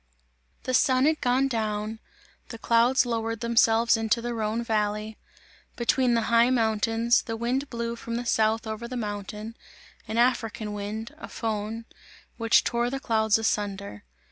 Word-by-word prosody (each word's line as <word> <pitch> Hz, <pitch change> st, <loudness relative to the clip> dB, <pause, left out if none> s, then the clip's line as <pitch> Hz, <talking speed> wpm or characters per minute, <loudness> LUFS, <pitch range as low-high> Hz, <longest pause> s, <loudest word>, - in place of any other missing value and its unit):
The 255 Hz, -, -3 dB
sun 260 Hz, +1 st, +3 dB
had 310 Hz, 0 st, +1 dB
gone 255 Hz, +2 st, +2 dB
down; 215 Hz, -2 st, -2 dB, 0.5 s
the 230 Hz, -, -7 dB
clouds 235 Hz, +3 st, +3 dB
lowered 230 Hz, -2 st, -2 dB
themselves 230 Hz, 0 st, +3 dB
into 225 Hz, +1 st, +1 dB
the 240 Hz, +1 st, -4 dB
Rhone 220 Hz, +1 st, -2 dB
valley 215 Hz, -1 st, -2 dB, 0.6 s
between 240 Hz, +1 st, +2 dB
the 230 Hz, -, +1 dB
high 235 Hz, +1 st, +5 dB
mountains; 225 Hz, 0 st, +2 dB
the 225 Hz, -1 st, -5 dB
wind 255 Hz, +5 st, -1 dB
blew 235 Hz, -1 st, -3 dB
from 230 Hz, 0 st, -6 dB
the 240 Hz, +1 st, -3 dB
south 220 Hz, -1 st, +1 dB
over 220 Hz, +2 st, -5 dB
the 250 Hz, +1 st, -5 dB
mountains 210 Hz, 0 st, -5 dB, 0.5 s
an 220 Hz, +1 st, -3 dB
African 225 Hz, -3 st, 0 dB
wind, 210 Hz, +2 st, -5 dB
a -, -, -8 dB
Föhn, 220 Hz, 0 st, -4 dB, 0.5 s
which 230 Hz, -1 st, +4 dB
tore 240 Hz, 0 st, 0 dB
the 270 Hz, +1 st, -3 dB
clouds 220 Hz, -3 st, +2 dB
asunder. 200 Hz, -, -2 dB
230 Hz, 150 wpm, -26 LUFS, 220-235 Hz, 0.6 s, high